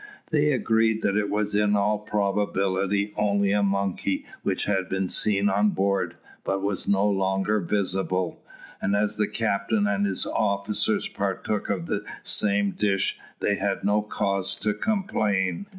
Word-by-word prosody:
They 150 -1 +3
agreed 110 -3 +2
that 100 - +1
it 105 -1 +1
was 105 0 0
in 105 0 +3
all 105 +1 +1
probability 100 -1 0
only 100 -1 +2
a 105 0 +2
monkey 100 -1 -1 0.2
which - - -1
had 95 -3 0
been 95 0 -1
seen 100 +1 +2
on 105 +1 +3
board, 95 -3 0 0.3
but 95 0 -1
was 100 -2 -2
no 100 +1 +3
longer 95 +1 +1
visible; 95 -1 -1 0.4
and 100 - +1
as 105 +1 0
the 105 - +1
captain 105 -1 0
and 100 0 +1
his 95 - -1
officers 100 -1 0
partook 105 -1 -2
of 95 -4 -1
the - - -2 0.2
same 100 -1 +3
dish, 100 -2 0 0.2
they 100 - +1
had 100 -1 -1
no 105 +1 +2
cause 100 -2 -1
to 105 +2 -1
complain. 110 - -1
100 Hz, 150 wpm, -25 LUFS, 95-105 Hz, 0.4 s, They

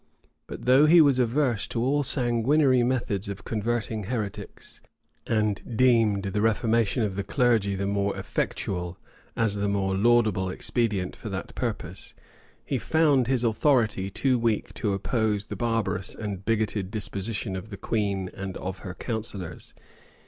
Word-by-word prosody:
But - - -8
though 130 +4 +6
he 170 +2 +7
was 140 -5 +5
averse 125 -2 +1
to 115 - -2
all 145 +3 +2
sanguinary 130 +1 +2
methods 120 -6 -1
of 100 +1 -6
converting 110 -1 -2
heretics, 105 -3 -5 0.5
and 110 0 -1
deemed 115 -6 +4
the 100 +1 -1
reformation 115 +1 +2
of 100 -3 -2
the 100 - -2
clergy 115 -7 +2
the 100 +1 -2
more 100 0 0
effectual, 90 -2 -3 0.4
as 115 -3 +2
the 100 0 -1
more 95 -1 0
laudable 110 -3 +3
expedient 100 -1 -1
for - - -7
that - - -5
purpose,[] - - -4 0.5
he - - -1
found 145 -6 +3
his 130 -2 +1
authority 110 -4 +2
too 130 +5 +1
weak 115 -2 0
to 105 -3 -1
oppose 105 0 0
the - - -6
barbarous 115 -5 -1
and 100 -3 -5
bigoted 110 -4 0
disposition 105 -1 -3
of 95 +3 -6
the 100 - -7
queen 100 -4 -1
and 95 -1 -5
of 95 0 -5
her 90 -2 -7
counsellors. 105 -6 -5
110 Hz, 150 wpm, -26 LUFS, 100-120 Hz, 0.5 s, he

